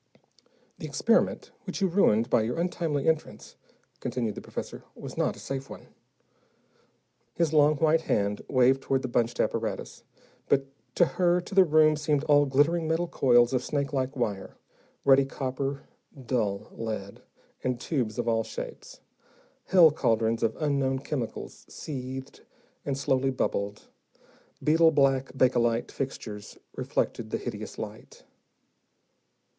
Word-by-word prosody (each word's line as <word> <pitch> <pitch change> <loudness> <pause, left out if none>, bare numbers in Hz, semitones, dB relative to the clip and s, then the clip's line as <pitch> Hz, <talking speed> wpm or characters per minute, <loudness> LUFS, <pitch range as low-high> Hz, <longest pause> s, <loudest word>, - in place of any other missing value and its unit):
"The - - -5
experiment - - +1
which - - -4
you 195 - +2
ruined 120 - +3
by 120 - +3
your 115 +5 -2
untimely 165 -5 -1
entrance," 160 -1 -2 0.4
continued 115 -4 -2
the - - -8
professor, - - -7
"was - - -8
not - - 0
a - - -13
safe 135 0 -5
one." - - -11 1.5
His 165 -2 +1
long 150 0 +5
white 160 +2 +3
hand 100 -8 0
waved 130 0 +4
toward 135 -1 0
the - - -1
bunched 120 -1 0
apparatus, - - -2 0.5
but 135 -1 +3 0.3
to 175 - +5
her 175 0 +2
to 180 - -11
the 190 0 +7
room 155 -2 +4
seemed 150 -1 0
all 145 -2 +4
glittering 155 +5 +2
metal 165 +2 0
coils 120 -4 +4
of 130 - +1
snakelike 140 -2 -2
wire, 105 -6 -3 0.5
ruddy 135 0 +6
copper, 135 +1 -4 0.4
dull 110 -5 -1
lead, 110 -3 -6 0.4
and 125 -2 -1
tubes 125 -7 -2
of 120 -1 -2
all 115 -1 +2
shapes. - - -8 0.6
Hell 175 -4 +7
cauldrons 115 -5 +1
of 115 - +1
unknown 140 -3 +1
chemicals 130 -3 -5
seethed 130 -2 -7 0.4
and 135 -1 -2
slowly 135 -1 +1
bubbled, 100 -5 -2 0.8
beetle 160 +2 +5
black 135 -3 +2
bakelite 120 -2 +2
fixtures 110 -6 -6 0.2
reflected - - -2
the - - -1
hideous - - -6
light. - - -9
135 Hz, 135 wpm, -27 LUFS, 120-150 Hz, 1.5 s, the